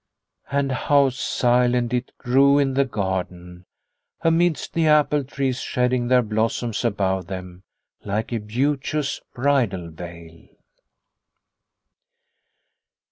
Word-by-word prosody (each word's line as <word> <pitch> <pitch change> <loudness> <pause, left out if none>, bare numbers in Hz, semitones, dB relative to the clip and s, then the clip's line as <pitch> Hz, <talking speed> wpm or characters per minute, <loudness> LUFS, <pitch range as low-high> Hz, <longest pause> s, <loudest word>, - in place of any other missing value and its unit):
And 140 -1 0
how 140 +1 +3
silent 125 -1 +1
it 125 +1 -2
grew 135 +3 +4
in 140 -2 +2
the 140 +1 +2
garden, 90 -5 -4 0.6
amidst 165 0 +1
the 165 -1 +2
apple 150 -1 +3
trees 135 -1 -2
shedding 125 -1 0
their 125 0 +4
blossoms 110 +1 -1
above 95 -5 0
them 90 -1 -7 0.4
like 110 +4 -3
a 115 - 0
beauteous 140 +6 -1
bridal 120 -11 0
veil. 85 0 -11
125 Hz, 100 wpm, -23 LUFS, 95-140 Hz, 0.6 s, grew